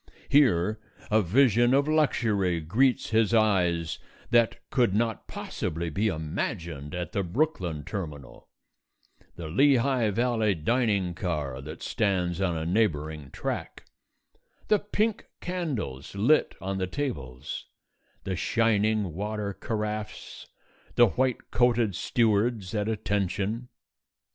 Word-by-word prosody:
Here 110 - +4 0.3
a 110 +1 +5
vision 120 +5 +4
of 140 +1 +2
luxury 110 - +2
greets 115 +13 +1
his 110 0 +3
eyes 90 -7 +2 0.3
that 115 -1 +4
could 120 -7 +2
not 115 -1 -1
possibly 85 +1 -4
be 105 +8 0
imagined 80 -2 -3
at 90 0 -4
the 105 -3 0
Brooklyn 90 - -1
terminal 75 -7 -7 0.9
the 85 - -6
Lehigh 130 - +3
Valley 110 -1 +1
dining 100 0 +1
car 75 -8 -3
that 75 +3 -8
stands 90 -3 0
on 90 -4 0
a 80 - -3
neighbouring 80 -7 0
track, - - -5 0.8
the 210 - +5
pink 210 +1 -1
candles 130 - -4
lit 120 +10 +3
on 95 0 -3
the 95 - -1
tables, 75 - -5 0.6
the 95 - -2
shining 110 -3 +1
water 105 +2 -3
carafes, 105 +1 -5 0.5
the 120 -2 +6
white 130 +3 -1
coated 120 -2 +3
stewards 110 0 +1
at 105 0 0
attention. 105 +2 -1
105 Hz, 115 wpm, -27 LUFS, 85-120 Hz, 0.9 s, the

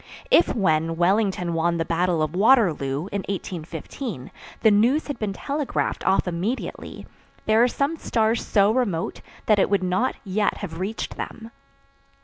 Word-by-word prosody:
If, 345 - +5
when 165 -6 +1
Wellington 185 0 +1
won 170 +1 +1
the 165 - -1
battle 170 -1 +1
of 155 +2 -3
Waterloo, 180 - +3
in 200 - -1
1815, 170 - -6 0.3
the 220 - +5
news 240 +9 +3
had 285 -4 -5
been 215 -2 -2
telegraphed 285 +7 -2
off 190 0 +3
immediately, 180 +9 -4 0.4
there 220 +1 +4
are 245 - +5
some 280 +6 -1
stars 225 -4 0
so 200 0 +3
remote 220 -9 -1 0.2
that 215 -2 +4
it - - +3
would 200 -2 +1
not 185 +8 0
yet 205 +1 0
have 165 -5 -6
reached 200 +4 -4
them. 225 0 -7
195 Hz, 150 wpm, -24 LUFS, 170-225 Hz, 0.4 s, If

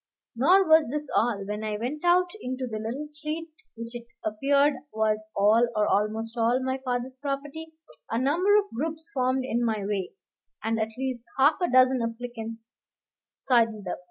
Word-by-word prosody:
Nor 360 +10 +5
was 315 -4 +5
this 295 +1 -4
all: 215 -4 +1
when 210 +2 -4
I 215 -1 -2
went 260 +8 -4
out 355 +1 +4
into 255 +1 -3
the 220 -3 -4
little 235 +7 -4
street 305 +2 -6 0.3
which 230 +1 -7
it 235 -1 -8 0.2
appeared 280 +7 +3 0.2
was 215 0 0
all, 215 +4 +4
or 210 0 +3
almost 220 +3 0
all, 235 +2 +2
my 260 0 -2
father's 250 0 -3
property, 290 +3 -5 0.4
a 225 - -1
number 340 - +3
of 410 -1 -1
groups 320 +5 -4
formed 255 0 +1
in 240 -2 0
my 220 -4 -1
way, 200 -2 -2 0.5
and 225 0 0
at 220 0 0
least 255 -2 -3
half 285 +3 +5
a 355 - +1
dozen 255 0 +5
applicants 230 -1 -5 0.7
sidled 225 -5 +1
up. - - -3
250 Hz, 170 wpm, -27 LUFS, 225-290 Hz, 0.7 s, Nor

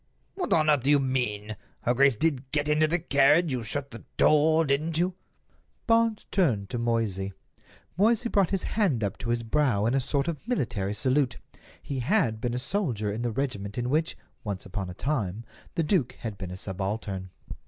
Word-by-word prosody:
"What 370 -2 -4
on 155 -1 +4
earth 150 -3 +4
do 135 - 0
you 145 -1 +6
mean?" 115 -6 -1 0.3
"Her 120 - +1
grace 135 0 +4
did 135 -1 0
get 145 -1 0
into 150 +1 +3
the 170 +3 +2
carriage; 155 0 +4
you 125 -2 -1
shut 140 +5 -4
the 115 - -10
door, 155 +2 +4
didn't 155 +3 0
you?" 180 +2 +1 0.7
Barnes 230 -1 +2
turned 115 - +1
to 120 - -2
Moysey. 110 -5 -1 0.7
Moysey 230 +3 +3
brought 200 -5 +2
his 195 -2 -1
hand 175 - 0
up 100 -1 -3
to 115 - -5
his 120 0 0
brow 115 -4 +1
in 115 - +2
a 135 - +3
sort 140 +3 0
of 170 +4 -4
military 110 - -1
salute—he 130 +2 -2
had 125 - +1
been 120 -1 -1
a - - -1
soldier 125 - -1
in 110 - -4
the 120 -1 -1
regiment 105 -5 -3
in 120 +1 -1
which, 160 +3 0 0.3
once 100 -3 -4
upon 95 -1 -4
a 90 - -8
time, 115 -5 -2 0.3
the 165 - +1
duke 150 - +1
had 110 -3 -6
been 95 -2 -7
a 90 - -7
subaltern. 95 0 -4
130 Hz, 190 wpm, -27 LUFS, 110-155 Hz, 0.7 s, you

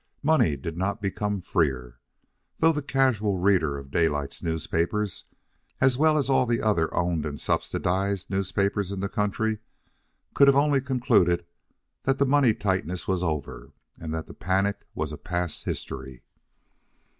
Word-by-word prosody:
Money 130 - +3
did 80 +4 -6
not 95 +4 -1
become 100 0 -2
freer, 65 -9 -1 0.6
though 165 - +4
the 150 -2 -2
casual 130 -8 +1
reader 90 -6 +2
of 70 -1 -10
Daylight's 75 -4 0
newspapers, 85 +5 -1 0.5
as 130 -1 +4
well 155 +3 +3
as 140 - +1
of 135 - +2
all 130 - +4
the 120 0 +1
other 95 -7 +1
owned 85 -3 0
and 75 -1 -5
subsidised 95 +1 -1
newspapers 100 0 -1
in 100 - -4
the 100 - -1
country, 105 +2 -1 0.7
could 140 -1 +6
only 140 0 +4
have 135 - -9
concluded 105 -10 +2 0.6
that 135 0 +1
the 140 - +3
money 135 -5 +4
tightness 95 -3 -2
was 95 -2 0
over 80 -5 -4 0.3
and 80 -2 -6
that 80 0 -3
the - - -11
panic 95 +2 -1
was 75 0 -3
past 90 -1 -3
history. 65 -2 -6
95 Hz, 150 wpm, -26 LUFS, 80-115 Hz, 0.7 s, could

